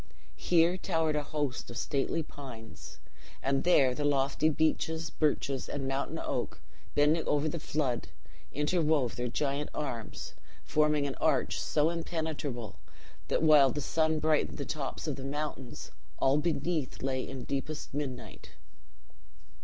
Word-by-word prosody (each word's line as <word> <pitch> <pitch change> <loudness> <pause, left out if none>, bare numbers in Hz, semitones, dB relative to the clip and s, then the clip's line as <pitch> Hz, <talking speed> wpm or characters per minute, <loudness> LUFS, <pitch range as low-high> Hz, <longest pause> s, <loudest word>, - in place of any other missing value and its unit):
Here 175 +1 +4
towered 160 -4 +1
a 150 - +2
host 145 -3 -3
of 120 - -6
stately 145 +5 0
pines; 125 -7 -10 0.5
and 135 0 +1
there 140 -8 +5
the 145 - -3
lofty 140 +1 +2
beeches, 160 +1 0
birches, 140 -3 0
and 135 -2 -3
mountain 135 +1 -1
oak, - - -3 0.4
bending 150 +3 +4
over 150 +1 +2
the 160 +2 -2
flood, 130 - -1 0.4
interwove 150 -4 +2
their 125 0 -2
giant 140 +3 -1
arms; 120 -7 -4 0.3
forming 150 -1 +2
an 140 - -1
arch - - +2
so 150 +2 +2
impenetrable, 155 - -3 0.5
that - - +1
while 150 -4 +7
the 150 - -2
sun 160 +2 +1
brightened 155 0 +1
the 140 - -3
tops 145 -4 -4
of 150 -4 -2
the 135 - -6
mountains, 140 -2 -4 0.3
all 135 +2 +4
beneath 155 -3 -1
lay 130 -1 0
in 130 -2 -6
deepest 140 +3 -4
midnight. 135 -4 -5
145 Hz, 140 wpm, -31 LUFS, 135-155 Hz, 0.5 s, while